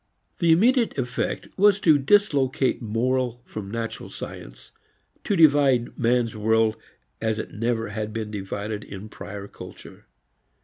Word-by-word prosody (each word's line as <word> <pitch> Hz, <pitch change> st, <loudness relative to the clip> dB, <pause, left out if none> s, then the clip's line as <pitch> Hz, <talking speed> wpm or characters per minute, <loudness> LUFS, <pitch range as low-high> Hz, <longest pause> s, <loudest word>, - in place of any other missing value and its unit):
The 170 Hz, -2 st, +4 dB
immediate 235 Hz, -, +3 dB
effect 125 Hz, -1 st, -2 dB
was 200 Hz, 0 st, +5 dB
to 155 Hz, -4 st, +5 dB
dislocate 140 Hz, -7 st, +2 dB
moral 120 Hz, +2 st, -1 dB
from 105 Hz, -3 st, -7 dB
natural 115 Hz, +1 st, -5 dB
science, -, -, -9 dB, 0.5 s
to 205 Hz, -, 0 dB
divide 140 Hz, -7 st, +4 dB
man's 120 Hz, -1 st, +1 dB
world 110 Hz, +1 st, +2 dB, 0.5 s
as 110 Hz, -1 st, 0 dB
it 110 Hz, -, -6 dB
never 115 Hz, +1 st, -1 dB
had 105 Hz, 0 st, -4 dB
been 110 Hz, -1 st, -4 dB
divided 105 Hz, +1 st, -4 dB
in 100 Hz, +2 st, -9 dB
prior 100 Hz, -1 st, -8 dB
culture. -, -, -12 dB
115 Hz, 130 wpm, -24 LUFS, 110-140 Hz, 0.5 s, was